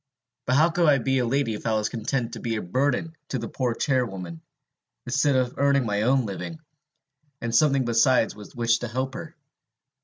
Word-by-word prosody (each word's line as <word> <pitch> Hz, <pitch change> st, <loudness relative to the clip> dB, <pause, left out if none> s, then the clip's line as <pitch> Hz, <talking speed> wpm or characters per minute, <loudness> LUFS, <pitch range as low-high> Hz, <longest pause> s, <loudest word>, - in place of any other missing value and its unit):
But 130 Hz, -, +2 dB
how 160 Hz, +4 st, +4 dB
could 170 Hz, -1 st, +2 dB
I 140 Hz, -, +5 dB
be 135 Hz, +1 st, 0 dB
a 125 Hz, -, 0 dB
lady 135 Hz, -2 st, 0 dB
if 105 Hz, -, -5 dB
I 110 Hz, -, +2 dB
was 105 Hz, 0 st, 0 dB
content 120 Hz, +1 st, -3 dB
to -, -, -6 dB
be 115 Hz, -2 st, -2 dB
a 105 Hz, -, -2 dB
burden 140 Hz, -, -1 dB
to 135 Hz, -, -2 dB
a 115 Hz, -1 st, -4 dB
poor 125 Hz, -1 st, -2 dB
charwoman, 95 Hz, -, -2 dB, 0.6 s
instead 145 Hz, -2 st, +2 dB
of 130 Hz, -1 st, 0 dB
earning 140 Hz, -2 st, +3 dB
my 105 Hz, -1 st, 0 dB
own 130 Hz, +2 st, +2 dB
living, 135 Hz, -, -6 dB, 0.8 s
and 115 Hz, 0 st, -4 dB
something 140 Hz, -1 st, +3 dB
besides 120 Hz, 0 st, +3 dB
with 105 Hz, -1 st, -12 dB
which 115 Hz, -1 st, +2 dB
to 120 Hz, -, -4 dB
help 130 Hz, +3 st, -3 dB
her? -, -, -8 dB
125 Hz, 195 wpm, -25 LUFS, 115-135 Hz, 0.8 s, I